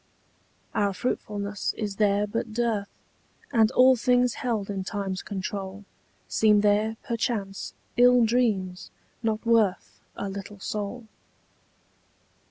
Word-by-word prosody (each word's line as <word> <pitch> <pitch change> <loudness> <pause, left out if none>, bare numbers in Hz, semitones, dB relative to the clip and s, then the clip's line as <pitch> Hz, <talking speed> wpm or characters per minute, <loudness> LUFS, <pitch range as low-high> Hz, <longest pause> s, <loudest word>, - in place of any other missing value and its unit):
Our 200 -1 +1
fruitfulness 205 -3 -2
is 205 -3 -3
there 205 -1 +3
but 225 +1 -4
dearth, 225 -4 0 0.6
And 220 -2 +5
all 260 +1 +6
things 245 0 +2
held 225 -6 -1
in 195 -2 -3
time's 195 -2 -3
control 195 0 -5 0.4
Seem 210 -2 +4
there, 210 +2 +2
perchance, 225 -5 -3 0.2
ill 245 -1 +6
dreams, 210 -6 0 0.3
not 220 -1 -1
worth 225 -5 +2 0.2
A 200 - -4
little 200 +1 -7
soul. 210 +4 -4
210 Hz, 110 wpm, -26 LUFS, 200-230 Hz, 0.6 s, all